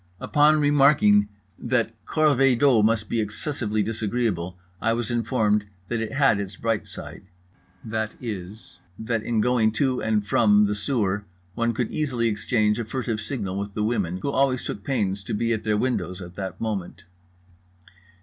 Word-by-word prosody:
Upon 150 +1 +3
remarking 140 -8 +4 0.3
that - - 0
corvée 135 -5 +3
d'eau 130 -4 +4
must 110 0 +2
be 115 - -1
excessively 110 0 -2
disagreeable, 105 -5 -2 0.2
I 115 +1 +2
was 120 0 -2
informed 110 -3 +1 0.2
that 120 -1 -1
it 115 - -4
had 135 -6 +3
its 100 -1 -5
bright 115 -2 -1
side, - - -8 0.6
viz., 110 -2 -6 0.2
that 115 0 -2
in 110 -1 0
going 115 -2 +2
to 130 0 0
and 110 -2 0
from 105 0 +4
the 105 - 0
sewer 105 -3 0 0.3
one 115 +1 -1
could 120 -1 -2
easily 125 -7 0
exchange 105 0 +1
a 115 - -2
furtive 115 -2 -3
signal 100 -6 -4
with 100 0 -5
the 105 - -1
women 100 -6 -1
who 140 - 0
always 135 -2 +1
took 100 - -5
pains 100 -7 -1
to - - -3
be 115 +2 0
at 110 - -2
their 105 -1 +2
windows 105 -6 -1
at 90 -2 -9
that 95 -1 -6
moment. 105 -5 -4
110 Hz, 160 wpm, -24 LUFS, 105-125 Hz, 0.6 s, remarking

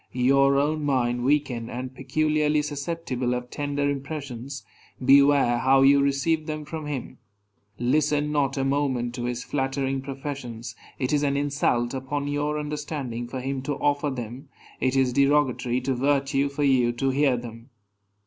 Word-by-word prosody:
Your 135 +2 +4
own 150 +2 +1
mind 120 -4 +1
weakened, 130 -4 0
and 125 +1 -5
peculiarly 150 +3 +1
susceptible 140 -4 -2
of 125 0 -6
tender 145 -1 -1
impressions, 140 -2 -5 0.4
beware 140 -3 +5
how 135 +1 +4
you 140 +1 +6
receive 140 +3 +1
them 155 -1 -4
from 155 0 -6
him. 130 -3 -5 0.6
Listen 150 +4 +1
not 140 -2 0
a 135 - +1
moment 135 -3 0
to 120 -1 -4
his 125 0 -3
flattering 135 -1 -1
professions; 130 -4 -6 0.2
it 130 +2 -1
is 145 - +3
an 140 -1 +1
insult 140 -4 0
upon 140 +2 -3
your 145 +1 -1
understanding 145 -5 -4
for 130 +1 -5
him 135 +1 -3
to 145 +2 -2
offer 145 +1 0
them; 130 +2 -7 0.3
it 130 0 +1
is 130 -2 +2
derogatory 130 -3 +2
to 130 +1 -1
virtue 140 +1 +1
for 140 +1 -3
you 130 -4 +3
to 135 +3 0
hear 135 -2 +2
them. 115 +1 -9
135 Hz, 155 wpm, -25 LUFS, 125-145 Hz, 0.6 s, you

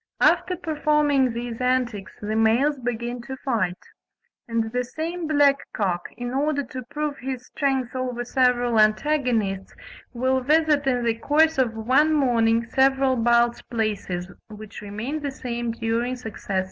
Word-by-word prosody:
After 350 +4 +3
performing 300 -5 +2
these 235 0 -5
antics 245 -6 -1
the 215 +1 -3
males 240 +6 +3
begin 240 0 -3
to 265 +3 -7
fight: 210 -9 0 0.7
and 230 -1 -1
the 250 +1 0
same 320 +6 -4
black 285 -2 +4 0.2
cock, 180 -4 -1
in 245 0 -4
order 285 +1 0
to 260 -1 -7
prove 295 0 -3
his 255 -1 -5
strength 265 -3 -1
over 250 -1 -3
several 245 -3 +2
antagonists, 215 -4 +1 0.4
will 260 +1 0
visit 300 0 +2
in 250 -2 +1
the 230 - +2
course 315 +3 +3
of 235 -4 +1
one 260 +8 +3
morning 235 -5 +2
several 265 +1 +2
Balz 235 0 +2
places, 210 -6 -2 0.2
which 215 -1 -10
remain 215 +9 -4
the 290 -1 -3
same 240 -3 -4
during 230 +2 -1
successive 225 -6 -10
years. - - +4
250 Hz, 145 wpm, -24 LUFS, 230-280 Hz, 0.7 s, black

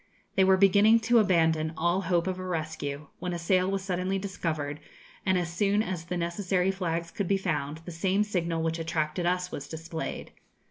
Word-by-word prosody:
They 190 - +4
were 190 0 +5
beginning 205 +4 +6
to 235 +1 +4
abandon 160 -5 +2
all 170 +3 +1
hope 175 -2 +1
of 185 -1 -2
a - - -5
rescue, 155 -4 -4
when 180 0 -3
a - - -2
sail 185 +2 +2
was 195 -1 -1
suddenly 185 0 -1
discovered; 160 -7 -3 0.5
and 190 -1 +4
as 170 -1 -2
soon 205 +3 +2
as 180 -5 -4
the 180 +1 -3
necessary 180 +2 0
flags 170 -3 -3
could 200 - -2
be 195 - +3
found, 155 -5 -2
the 175 - -6
same 190 +5 +1
signal 170 -5 -1
which 165 0 -1
attracted 165 +1 -1
us 180 0 0
was 140 - -6
displayed. 160 0 -5
180 Hz, 190 wpm, -28 LUFS, 165-190 Hz, 0.5 s, beginning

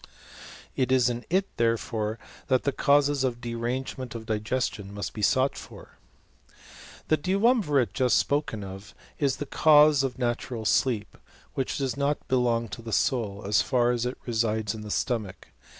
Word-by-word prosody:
It 130 -1 0
is 125 -2 +4
in 120 0 -6
it, 190 +3 +2
therefore, 115 -1 0 0.3
that 130 -1 +2
the 140 - +1
causes 140 0 +2
of 125 -2 -1
derangement 120 +2 -4
of 110 -1 -6
digestion 110 -1 -2
must 100 -4 -4
be 105 - -6
sought 130 +6 +2
for. - - -12 1.1
The 155 - +4
duumvirate 185 - +2
just 125 -2 +3
spoken 140 -8 -1
of 95 +1 -10 0.2
is 140 -3 +1
the 145 - -5
cause 150 -1 +5
of 135 -2 -2
natural 120 -2 -2
sleep, 110 -2 +1 0.4
which 135 - -2
does 135 -4 -1
not 140 +1 -1
belong 120 -2 +1
to 115 - -7
the 115 0 -7
soul, 110 -5 0
as 100 0 +3
far 120 -2 +2
as 120 0 -1
it 125 - -5
resides 110 -2 0
in 110 - -7
the 105 - -8
stomach. 110 -4 -3
125 Hz, 160 wpm, -27 LUFS, 110-135 Hz, 1.1 s, cause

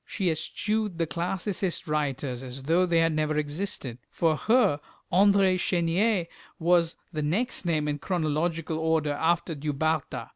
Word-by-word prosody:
She 190 -5 -1
eschewed 205 +5 -2
the 165 - +1
Classicist 180 +2 -2
writers 140 -4 -2
as 130 +1 -8
though 170 +5 +3
they 170 -1 +2
had 165 -1 +3
never 155 0 0
existed. 145 - -3
For 165 -2 +1
her 215 - +3 0.3
André 195 -1 +4
Chenier 180 +3 +1 0.3
was 170 0 +2 0.2
the 155 - -2
next 185 +8 -1
name 155 -3 +1
in 145 0 -2
chronological 160 -1 -1
order 160 -2 +1
after 170 +3 0
Du 150 0 -3
Bartas. 140 -5 -1
165 Hz, 145 wpm, -27 LUFS, 150-180 Hz, 0.3 s, André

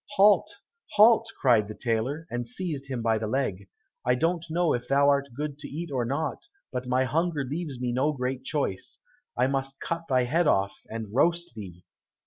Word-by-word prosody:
"Halt, 205 +1 +5 0.4
halt!" 220 +2 +6
cried 115 -6 +4
the 110 - -7
tailor, 125 +7 -1
and 120 0 -3
seized 140 +1 -4
him 130 -4 -3
by 110 -1 +2
the 110 - -3
leg. 100 -6 -2 0.3
"I 125 0 +3
don't 165 +4 0
know 170 0 +2
if 125 0 -3
thou 140 +1 +4
art 140 0 +2
good 145 0 -4
to - - -7
eat 165 +2 -6
or 125 -3 0
not, 145 - -3 0.2
but 125 0 -4
my 130 +1 +2
hunger 160 +2 0
leaves 145 -1 -4
me 125 -1 -1
no 135 +5 +1
great 130 -2 -3
choice. 135 -10 -3 0.4
I 125 - +4
must 135 0 -2
cut 170 0 -3
thy 130 -2 +3
head 160 +7 +1
off, 95 -4 +2 0.2
and 110 -2 -6
roast 170 +6 +2
thee." 90 -5 -10
135 Hz, 190 wpm, -27 LUFS, 120-160 Hz, 0.4 s, halt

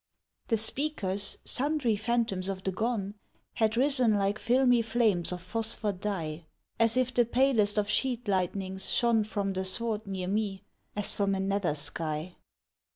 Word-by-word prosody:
The 225 - +2
speakers, 215 -5 0
sundry 275 -4 +1
phantoms 220 -4 -1
of 190 -1 -4
the 190 - 0
gone, 205 -1 -2 0.4
Had 220 0 +1
risen 255 -4 +3
like 200 +1 0
filmy 245 -1 +3
flames 220 -7 +1
of 180 -1 -5
phosphor 220 +1 0
dye, 170 -5 -4 0.3
As 230 +1 +3
if 255 0 +1
the 240 - +4
palest 235 -4 +2
of 210 -1 +2
sheet 245 +1 0
lightnings 190 0 -1
shone 235 -2 +3
From 205 -2 -2
the 190 0 -2
sward 215 +2 -1
near 190 -2 -3
me, 200 -1 -2 0.3
as 205 -1 0
from 200 -1 0
a - - -2
nether 195 -5 0
sky. 155 +3 -4
210 Hz, 155 wpm, -29 LUFS, 190-235 Hz, 0.4 s, the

